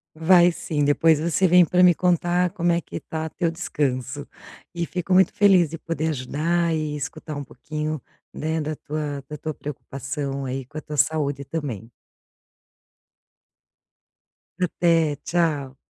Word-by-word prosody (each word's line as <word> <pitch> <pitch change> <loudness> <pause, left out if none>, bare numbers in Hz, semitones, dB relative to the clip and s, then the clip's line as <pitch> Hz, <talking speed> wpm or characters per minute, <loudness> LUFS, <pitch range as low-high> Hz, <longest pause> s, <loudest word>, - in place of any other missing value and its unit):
Vai 175 +2 +6
sim. 150 -3 -2
Depois 150 +2 +4
você 170 +3 +2
vem 180 +1 +7
pra 180 +2 +3
me 175 -1 +7
contar 175 0 +2
como 175 -2 +1
é 170 - +1
que - - -7
tá 160 0 -5
o - - -7
teu 170 0 -1
descanso. 140 -3 -2 0.5
E 170 0 -1
fico 180 +2 -3
muito 190 +1 +5
feliz 185 -6 +4
em 165 - -5
poder 160 -1 -2
ajudar 160 +4 0
e 155 -1 -2
escutar 150 +2 -6
um 145 - -4
pouquinho, 150 +2 -5 0.3
né, 160 +1 -2
da 155 +1 -2
tua 145 -2 -4
da 150 - -6
tua 155 +1 -4
preocupação 140 -1 -5
aí 130 +1 -3
com 155 +4 -8
a - - -3
tua 150 0 -7
saúde 145 -1 +1
também. 125 -8 -5 2.7
Até. 165 -4 +2
Tchau. 150 -6 0
155 Hz, 150 wpm, -24 LUFS, 145-170 Hz, 2.7 s, vem